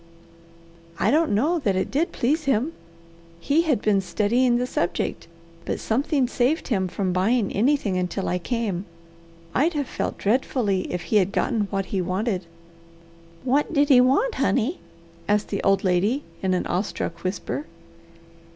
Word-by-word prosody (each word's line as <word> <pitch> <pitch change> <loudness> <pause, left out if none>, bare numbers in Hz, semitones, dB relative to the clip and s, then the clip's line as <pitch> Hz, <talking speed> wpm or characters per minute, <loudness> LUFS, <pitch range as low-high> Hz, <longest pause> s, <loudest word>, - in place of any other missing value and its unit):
"I - - +3
don't 315 +2 +3
know 295 +12 +2
that 200 -10 0
it 190 - -1
did 305 +6 0
please 300 +6 0
him. 275 +4 +1 0.7
He 285 - +2
had 295 -10 0
been 200 -2 +3
studying 240 +6 +2
the 250 - 0
subject, 175 -9 -2 0.4
but - - -3
something 270 +3 +1
saved 255 +6 0
him 190 -6 +1
from 185 0 -2
buying 200 +4 +1
anything 215 -4 +1
until 180 +2 -2
I 180 - 0
came. 205 -3 -2 0.7
I'd 320 +6 +2
have 290 -2 -1
felt - - -3
dreadfully 210 -3 0
if 180 -1 -3
he 215 - +1
had 195 -1 +2
gotten 220 -2 0
what 195 -1 -1
he 190 - +1
wanted." 185 0 -2 1.0
"What 275 +5 +1
did 285 +1 +3
he 255 -3 +7
want, 275 - +3
honey?" 270 - 0 0.5
asked 210 0 +1
the 200 - -2
old 195 +1 +2
lady 200 +9 +1 0.2
in 185 -1 +1
an 180 - -1
awestruck 175 -2 -3
whisper. 195 +10 -3
220 Hz, 155 wpm, -24 LUFS, 190-275 Hz, 1.0 s, he